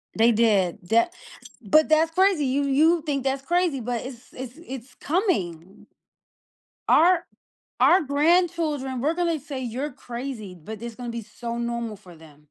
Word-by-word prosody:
They 230 +2 +5
did, 210 -4 +2
tha 230 +9 +4 0.5
but, 300 +9 +4
that's 320 +1 +4
crazy. 370 -5 +3
You 275 +2 +1
you 310 +5 +3
think 280 -3 -1
that's 270 0 -1
crazy, 345 -2 +1
but 240 0 -3
it's 250 -2 -11
it's 255 +2 -8
it's 260 -1 -8
coming. 195 - -2 1.0
Our 345 +1 +5 0.5
our 365 - +6
grandchildren 300 -3 +1
we're 315 +4 +1
gonna 340 -3 0
say 275 -1 -6
"You're 255 +5 -3
crazy," 240 -6 -7
but 210 +7 -9
it's 235 -1 -6
gonna 245 -1 -6
be 235 -1 -5
so 235 +2 -6
normal 235 -2 -3
for 180 -4 -15
them. 155 -2 -17
260 Hz, 155 wpm, -24 LUFS, 230-310 Hz, 1.0 s, our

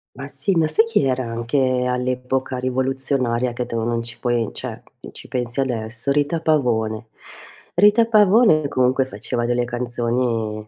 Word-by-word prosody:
Ma 135 +1 -7
sì, 145 +7 -1
ma 160 -2 +3
sai 220 +9 +4
chi 225 -9 +1
era 130 -1 0
anche 125 +2 0
all'epoca 125 +1 -2
rivoluzionaria, 130 -1 -1
che 125 0 -4
tu 115 - -3
non 115 0 -1
ci 115 0 -7
puoi 120 -3 0
cioè, - - -7 0.3
ci - - -12
pensi 125 0 -3
adesso, 115 -1 -2
Rita 145 +3 0
Pavone. 115 -8 0 0.7
Rita 210 +5 +5
Pavone 210 -7 +4
comunque 130 0 +1
faceva 120 0 -4
delle 120 0 0
canzoni 120 -3 -2
125 Hz, 145 wpm, -21 LUFS, 120-140 Hz, 0.7 s, Rita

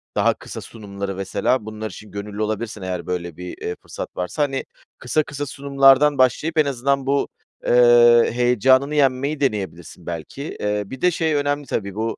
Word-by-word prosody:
daha - - +3
kısa - - -9
sunumları 100 -3 -7
mesela, 95 +5 -1
bunlar 110 0 -6
için 105 - -12
gönüllü 100 +1 -6
olabilirsen 110 0 -3
eğer, 90 -2 -4
böyle, 85 -2 -4
bir, 90 0 -7
eee, 90 - -3
fırsat - - -8
varsa, 90 +11 -1
hani, 135 -1 -2 0.3
kısa 150 +5 0
kısa 145 0 -5
sunumlardan 140 +1 +4
başlayıp 150 +5 +2
en 155 - +5
azından 140 0 0
bu, 140 0 +1 0.4
eee, 120 -1 +6
heyecanını 130 +4 +3
yenmeyi 140 +1 +1
deneyebilirsin 95 - -3
belki. 85 - -6
Eee, 105 0 -1
bir 130 +5 -9
de 180 - +4
şey 160 -1 0
önemli 145 0 -1
tabii, 100 -2 -3
bu, 110 +1 -2
120 Hz, 170 wpm, -21 LUFS, 100-140 Hz, 0.4 s, eee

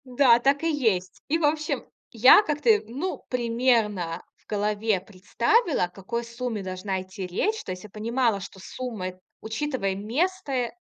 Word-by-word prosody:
Да, 250 -2 +5
так 275 +4 +2
и 330 - +2
есть. 215 - 0
И, 315 - +2
в 330 - +1
общем, 305 +1 0 0.3
я 250 - +8
как-то, 290 - +3
ну, 285 +11 -4
примерно 230 -8 +1
в - - -34
голове 210 0 0
представила, 215 - +1
о - - -10
какой 195 +6 -5
сумме 235 -3 -4
должна 185 +1 -3
идти 185 0 -7
речь. 425 - -1
То - - -6
есть 185 0 -7
я 215 - -10
понимала, 225 +1 0
что 190 0 -10
сумма 220 -3 -5
эт 185 0 -14 0.2
учитывая 220 -3 -2
место, 285 - -1
э, 250 -3 0
230 Hz, 165 wpm, -26 LUFS, 195-270 Hz, 0.3 s, я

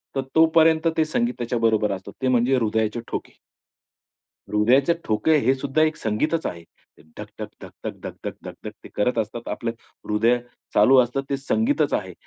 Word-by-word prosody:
तर 135 - +1
तोपर्यंत 160 0 +5
ते 160 - +3
संगीत 235 +10 0
त्याच्याबरोबर 115 -3 +1
असतं, 95 0 -6
ते 130 - +1
म्हणजे 125 +1 +3
हृदयाचे 110 -1 0
ठोके. - - -5 1.2
हृदयाचे 125 +9 +3
ठोके 110 +9 +2
हे 130 - +5
सुद्धा 135 +3 0
एक 155 0 +2
संगीतच 150 +10 -1
आहे. 85 -1 -7 0.5
धक-धक, - - -8
धक-धक, - - -8
धक-धक, - - -6
धक-धक - - -8
ते - - -11
करत 120 +4 +1
असतात. 115 +2 -4
आपलं 115 -1 -3 0.4
हृदय 115 +3 +3 0.4
चालू 110 +6 +6
असतं 125 +3 -1
ते 140 - 0
संगीतच 225 - +1
आहे. - - -2
125 Hz, 150 wpm, -23 LUFS, 110-155 Hz, 1.2 s, चालू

